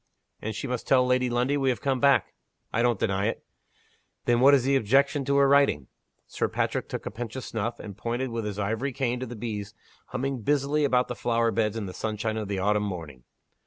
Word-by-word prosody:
"And 110 0 -4
she 110 - -4
must 125 -2 -3
tell 130 -2 +5
Lady 125 0 +2
Lundie 125 +4 +1
we 135 -1 +1
have 125 - 0
come 135 -2 0
back." 140 +1 +3 0.4
"I 115 - +2
don't 120 -4 +2
deny 100 -1 +1
it." 115 - -4 0.8
"Then 120 -1 +3
what 140 +3 +7
is 130 - +2
the 135 +2 +2
objection 135 +4 +3
to 140 +1 +2
her 140 0 +5
writing?" 140 - +3 0.4
Sir - - -1
Patrick - - -2
took - - -5
a - - -4
pinch 120 0 -6
of 130 - -5
snuff 115 +2 -3
and 100 -2 -8
pointed 120 +4 -3
with 115 -2 -3
his 105 -1 -4
ivory 110 +7 -1
cane 125 -1 -1
to 130 - -4
the 120 - -7
bees 105 -2 -5 0.3
humming 135 -1 -3
busily 145 +4 +1
about 125 -2 +2
the - - -3
flower 115 -1 +1
beds 110 -1 0
in 110 - -3
the 95 - -7
sunshine 110 +1 -2
of 105 -2 -3
the 100 -1 -2
autumn 105 +2 +2
morning. 80 -11 -6
120 Hz, 225 wpm, -27 LUFS, 105-135 Hz, 0.8 s, what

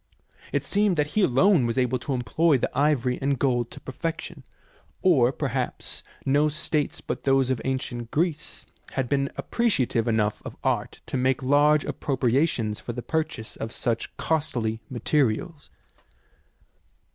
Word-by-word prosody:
It - - 0
seems 205 -3 +2
that 150 0 +1
he 215 - +3
alone 160 -2 +4
was 115 - -2
able 125 0 +1
to 135 +3 -3
employ 135 +5 +2
the 125 - -2
ivory 135 -3 +2
and 140 0 +1
gold 120 -3 +1
to - - -11
perfection, 165 +5 -5 0.6
or 135 -10 +5
perhaps 135 -3 -3 0.2
no 145 +3 +3
states 150 -1 -2
but - - -4
those 135 -1 +3
of 130 - -1
ancient 125 -3 -3
Greece 155 +1 -2 0.3
have 130 -2 -1
been 140 +1 +1
appreciative 130 - +1
enough 110 -2 +1
of - - -8
art - - -1
to - - -3
make 130 +1 +1
large 145 +2 +4
appropriations 125 -4 0
for 120 - -6
the 120 0 -5
purchase 160 -8 -3
of 110 - -4
such 115 -2 -2
costly 120 -8 -1
materials. 145 +4 0
135 Hz, 145 wpm, -26 LUFS, 120-150 Hz, 0.6 s, or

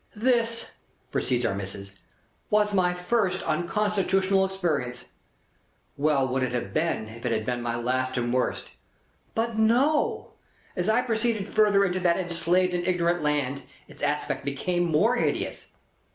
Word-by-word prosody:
"This," 230 0 +1 0.4
proceeds 125 -1 0
Our - - +1
Missis, 100 0 -6 0.6
"was 210 0 +2
my 180 -2 +3
first 185 +1 0
unconstitutional 195 +2 +1
experience. 155 -10 -2 0.9
Well 140 -2 +2
would 130 +1 -1
it 130 -1 -1
have 120 - -3
been, 155 -8 0
if 115 +2 -11
it 125 - -1
had 110 -1 -1
been 125 0 -2
my 120 -1 -2
last 130 +2 -1
and 120 0 -1
worst. 130 0 -1 0.7
But 225 0 -1
no. 255 +8 +2 0.4
As 180 +2 -1
I 235 +3 +3
proceeded 225 -3 -1
further 205 -2 +4
into 185 -1 -1
that 175 -2 +2
enslaved 180 0 +1
and 175 0 -1
ignorant 175 -1 +1
land, 145 -2 0 0.3
its - - -15
aspect 145 0 -1
became 175 +6 -1
more 175 +10 +3
hideous. - - -2
175 Hz, 145 wpm, -26 LUFS, 130-205 Hz, 0.9 s, further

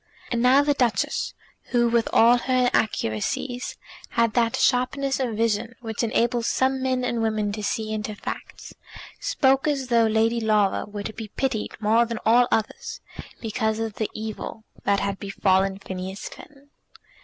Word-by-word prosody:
And 235 -1 0
now 260 +3 +6
the 290 0 +2
Duchess, 245 -5 0 0.3
who, 240 -1 +2
with 235 -1 +1
all 235 +2 +6
her 255 0 +1
inaccuracies, 220 - -1 0.3
had 230 -2 +1
that 230 -2 +2
sharpness 265 +2 +1
of 240 -5 -2
vision 230 +1 0
which 225 -2 -4
enables 235 +1 +1
some 265 0 +1
men 260 -1 0
and 235 -2 -1
women 215 -2 0
to 210 +1 -5
see 215 +1 -2
into 215 0 -3
facts, - - -7 0.5
spoke 275 - +2
as 275 -4 -1
though 230 -2 +4
Lady 225 +2 +2
Laura 210 -3 +2
were 205 0 -6
to 220 - -5
be 220 0 -7
pitied 225 -1 -3
more 225 +2 +3
than 230 -1 -4
all 240 +2 +5
others, 220 - -2 0.4
because 220 -1 -1
of 225 -1 -3
the 220 - -1
evil 220 0 -6 0.2
that 200 0 +2
had 200 -1 -2
befallen 195 -1 +1
Phineas 190 0 -6
Finn! 285 -1 -15
230 Hz, 160 wpm, -24 LUFS, 215-250 Hz, 0.5 s, now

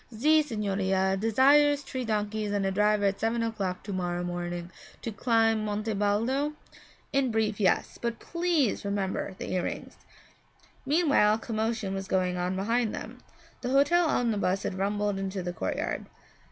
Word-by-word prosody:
'Ze 305 +8 +4
signorina 195 -6 0
desires 280 +7 +4
tree 260 -2 -4
donkeys 210 -1 -1
and 200 -1 0
a 195 - +1
driver 210 +1 +2
at 195 0 +1
seven 230 +1 0
o'clock 200 -5 -3
to 200 - -5
morrow 175 -1 -2
morning 175 0 -4 0.3
to 230 - -3
climb 225 0 +2
Monte 215 +1 -2
Baldo?' 230 +9 0 0.6
'In 275 -2 +2
brief, 220 -2 0
yes, 190 -3 +1
but 235 -1 -2
please 335 - 0
remember 200 -1 -2
the - - -5
earrings.' 180 -1 -3 0.9
Meanwhile 285 -9 +4
a - - -3
commotion 220 -3 -2
was 195 0 -4
going 185 -1 +1
on 180 +1 -1
behind 225 +4 0
them. 250 +3 -8 0.4
The 245 - -3
hotel 290 +6 +4
omnibus 210 -8 +1
had - - -2
rumbled 200 +1 -1
into 190 -1 -3
the 175 0 -3
courtyard. 160 - -3
210 Hz, 155 wpm, -28 LUFS, 195-235 Hz, 0.9 s, Ze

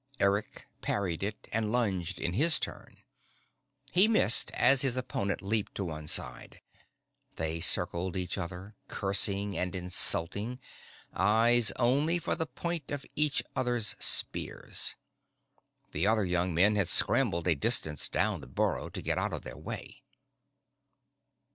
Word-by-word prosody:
Eric 100 +2 -1 0.2
parried 90 -5 -2
it 105 +2 -5
and 110 -1 -1
lunged 95 -7 -1
in 85 - -2
his 155 - +2
turn. - - -7 0.9
He 185 +4 +6
missed 215 - +4
as 130 +1 +5
his 130 -2 -1
opponent 100 -7 -3
leaped 105 +1 -2
to 100 - -3
one 80 -2 -7
side. 65 -4 -2 0.8
They 80 +1 -4
circled 90 +3 +3
each 90 -1 -3
other, 95 +4 -7
cursing 100 0 -2
and 90 +1 -3
insulting, 95 +5 0 0.6
eyes 110 +2 +3
only 140 +8 +1
for 170 - -2
the 160 -1 -3
point 170 -1 -4
of 145 -1 -5
each 150 -1 +1
other's 120 -4 0
spears. - - +2 1.0
The - - -1
other 110 -2 +2
young 90 0 0
men 95 +6 +3
had 100 -4 +1
scrambled 85 +1 +2
a 85 - +4
distance 75 0 +1
down - - -1
the - - -11
burrow 65 - -2
to - - -7
get - - -1
out - - -2
of - - -5
their - - -9
way. - - -8
100 Hz, 140 wpm, -29 LUFS, 90-120 Hz, 1.0 s, He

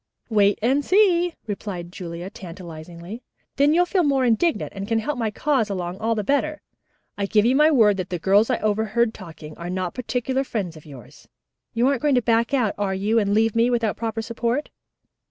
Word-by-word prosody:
"Wait 205 -2 +3
and 270 +5 +2
see," 355 -3 +3
replied 195 -5 -5
Julia 175 0 -7
tantalizingly. 175 +2 -9 0.4
"Then 285 +2 +4
you'll 350 +3 +4
feel 370 +1 +1
more 275 -5 +2
indignant 250 +8 +1
and 195 0 -5
can 225 - +1
help 280 +7 -2
my 230 -3 -1
cause 250 0 0
along 180 -1 -4
all 225 +1 0
the 210 - -2
better. 285 +6 -1 0.6
I 200 - 0
give 210 +1 +3
you 250 +3 +3
my 300 +2 +5
word 220 -9 +4
that 185 - -4
the 180 - -2
girls 200 +6 +3
I - - +2
overheard 220 +2 +1
talking 160 -5 -11
are 170 +1 -5
not 185 -1 -3
particular 255 +1 -2
friends 200 -10 -4
of 155 -1 -14
yours. 135 -6 -14 0.5
You 235 +2 +3
aren't 275 -3 +1
going 295 -3 +2
to 250 - +3
back 230 +1 +2
out, 250 -7 +1
are 195 -2 0
you, 210 +4 +1
and 205 -1 +1
leave 225 0 +2
me 230 +1 +3
without 230 -4 0
proper 225 -1 -3
support?" 235 +5 -2
220 Hz, 200 wpm, -23 LUFS, 190-255 Hz, 0.6 s, my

